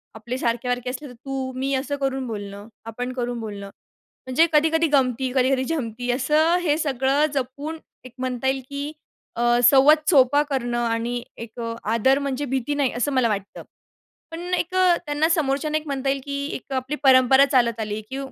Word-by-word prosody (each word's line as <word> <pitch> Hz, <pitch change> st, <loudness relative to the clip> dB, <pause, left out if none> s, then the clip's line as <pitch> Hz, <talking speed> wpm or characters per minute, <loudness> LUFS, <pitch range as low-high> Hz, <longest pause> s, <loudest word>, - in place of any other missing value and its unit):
आपले 235 Hz, +3 st, -5 dB
सारखे-सारखे 245 Hz, +1 st, -1 dB
असले 270 Hz, +4 st, -6 dB
तर -, -, -11 dB
तू, 265 Hz, +1 st, -5 dB
मी 270 Hz, +2 st, -2 dB
असं 280 Hz, +2 st, -2 dB
करून 270 Hz, -1 st, -2 dB
बोलणं, 205 Hz, -2 st, -7 dB, 0.2 s
आपण 245 Hz, +3 st, -5 dB
करून 245 Hz, -1 st, -3 dB
बोलणं, 205 Hz, -3 st, -7 dB, 0.6 s
म्हणजे 260 Hz, +6 st, +4 dB
कधी-कधी 320 Hz, +2 st, +3 dB
गमती, 260 Hz, -1 st, +2 dB
कधी-कधी 260 Hz, 0 st, +2 dB
जमती 245 Hz, -5 st, -3 dB
असं 300 Hz, +7 st, +2 dB
हे 305 Hz, -4 st, +1 dB
सगळं 275 Hz, -1 st, +1 dB
जपून 280 Hz, +4 st, -4 dB, 0.3 s
एक 255 Hz, -, -11 dB
म्हणता 255 Hz, 0 st, -3 dB
येईल 265 Hz, 0 st, 0 dB
की 285 Hz, +1 st, -4 dB, 0.4 s
अ, 235 Hz, -, -3 dB, 0.2 s
संवाद 275 Hz, +5 st, +7 dB
सोपा 285 Hz, -2 st, +5 dB
करणं 255 Hz, -5 st, -2 dB
आणि 235 Hz, +1 st, -2 dB, 0.2 s
एक 230 Hz, +1 st, -9 dB, 0.2 s
आदर, 230 Hz, +5 st, +2 dB
म्हणजे 280 Hz, 0 st, -2 dB
भीती 265 Hz, +1 st, -2 dB
नाही, 280 Hz, -3 st, +1 dB
असं 250 Hz, +4 st, -1 dB
मला 255 Hz, -3 st, +3 dB
वाटतं. 200 Hz, -2 st, -4 dB, 0.7 s
पण 330 Hz, -, -6 dB
एक 360 Hz, 0 st, -1 dB
त्यांना 330 Hz, -5 st, +2 dB
समोरच्याने 305 Hz, -1 st, 0 dB
एक 310 Hz, -, -6 dB
म्हणता 275 Hz, -1 st, -2 dB
येईल 275 Hz, 0 st, 0 dB
की 280 Hz, -, -5 dB, 0.2 s
एक 270 Hz, -, -8 dB
आपली 260 Hz, +3 st, -2 dB
परंपरा 265 Hz, 0 st, +6 dB
चालत 235 Hz, -4 st, +2 dB
आली 215 Hz, -1 st, -3 dB
की 265 Hz, -, -5 dB
265 Hz, 170 wpm, -23 LUFS, 245-285 Hz, 0.7 s, संवाद